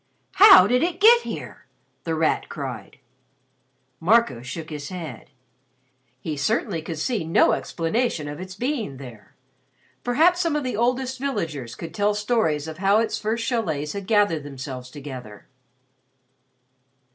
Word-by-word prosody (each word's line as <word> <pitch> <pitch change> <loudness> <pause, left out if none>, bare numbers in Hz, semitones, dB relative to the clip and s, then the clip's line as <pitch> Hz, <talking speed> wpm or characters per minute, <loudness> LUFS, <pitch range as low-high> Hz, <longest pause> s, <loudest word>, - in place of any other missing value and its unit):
"How 395 -1 +9
did 250 +1 +2
it 345 +1 -1
get 470 +3 +7
here?" - - -8 0.4
The 165 -1 -1
Rat 160 0 0
cried. 125 -8 -7 1.0
Marco 190 - +3
shook 155 +6 -7
his 145 -1 -6
head. 160 -10 -8 0.9
He 155 +3 -4
certainly 180 - -1
could 160 0 -6
see 210 +4 -1
no 165 +1 +3
explanation 165 -1 -1
of 145 +2 -7
its 185 0 -8
being 235 - -3
there. 120 -6 -12 0.7
Perhaps 325 +9 +3
some 335 -4 0
of 300 - -1
the 250 -4 -3
oldest 250 +3 0
villagers 155 - -3
could 165 +3 -8
tell 205 +2 +1
stories 210 -9 0
of 160 +1 -8
how 195 +2 +3
its 225 0 0
first 225 +2 -2
chalets 160 - -2
had 200 -2 -6
gathered 205 -7 +2
themselves 130 -2 -8
together. 130 -7 -9
180 Hz, 140 wpm, -23 LUFS, 145-240 Hz, 1.0 s, How